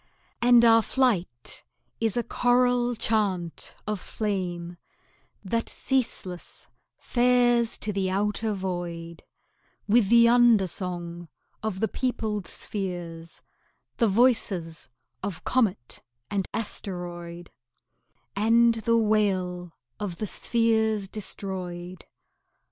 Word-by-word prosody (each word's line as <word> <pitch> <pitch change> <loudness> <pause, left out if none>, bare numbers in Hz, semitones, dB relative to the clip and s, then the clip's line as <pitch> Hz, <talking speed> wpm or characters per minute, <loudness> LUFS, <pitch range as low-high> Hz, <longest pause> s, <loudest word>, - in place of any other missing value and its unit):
And 240 0 +6
our 225 0 +7
flight 200 - -1 0.4
is 225 0 0
a 240 - +1
choral 245 0 +2
chant 200 -7 -1
of 210 -2 -2
flame, 180 -5 -3 0.7
That 230 +4 -1
ceaseless 225 -9 -3 0.3
fares 240 -1 +2
to 210 - -3
the 190 -1 0
outer 210 +3 0
void, 175 -3 -5 0.7
With 215 -1 +4
the 235 0 +7
undersong 185 -7 +2 0.3
of 215 -3 -3
the 220 - +3
peopled 215 -7 -2
spheres, 175 -4 -5 0.5
The 230 - +3
voices 200 -7 +1 0.3
of 195 -4 -5
comet 210 - 0 0.3
and 195 -2 -1
asteroid, 175 -5 -5 0.8
And 230 +2 +4
the 230 +1 +1
wail 190 -5 +1 0.3
of 190 -5 -4
the 215 - -2
spheres 220 -1 +1
destroyed. 185 -4 -6
205 Hz, 95 wpm, -26 LUFS, 180-230 Hz, 0.8 s, our